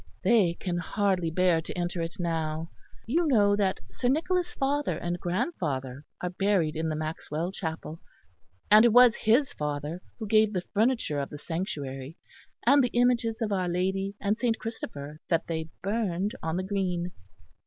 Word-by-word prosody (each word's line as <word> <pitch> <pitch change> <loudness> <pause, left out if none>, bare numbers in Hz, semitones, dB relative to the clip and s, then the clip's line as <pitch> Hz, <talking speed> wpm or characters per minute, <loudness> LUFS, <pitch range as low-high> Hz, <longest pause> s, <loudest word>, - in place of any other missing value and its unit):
They 195 -8 +4
can 175 -1 -3
hardly 190 -2 0
bear 175 0 +3
to 165 - -7
enter 175 0 -2
it 165 +3 -4
now. 165 -1 -2 0.3
You 320 +8 +1
know 205 -7 +4
that 195 -2 0
Sir 245 - -2
Nicholas' 350 +6 +1
father 285 +2 0
and 175 0 -3
grandfather 155 - -2 0.2
are 180 - -2
buried 185 -5 +1
in 160 +1 -1
the 155 - -1
Maxwell 155 +2 -3
chapel; 160 -3 -5 0.7
and 215 +1 +9
it 235 - +6
was 245 -1 +8
his 240 +5 +2
father 150 +3 -3 0.2
who 220 - -5
gave 215 0 +4
the 180 -2 -1
furniture 220 - +1
of 140 - -3
the 150 - -7
sanctuary, 145 -4 -5 0.5
and 280 +3 +6
the 245 - +1
images 240 -2 +3
of 215 - -2
Our 185 -3 0
Lady 190 +3 -1
and 210 +2 0
Saint 235 -2 +1
Christopher 150 -9 -6
that 165 -2 +2
they 160 -1 -3
burned 200 -2 0
on 160 +1 -2
the 185 - -1
green." 185 -3 -1
185 Hz, 165 wpm, -28 LUFS, 160-220 Hz, 0.7 s, and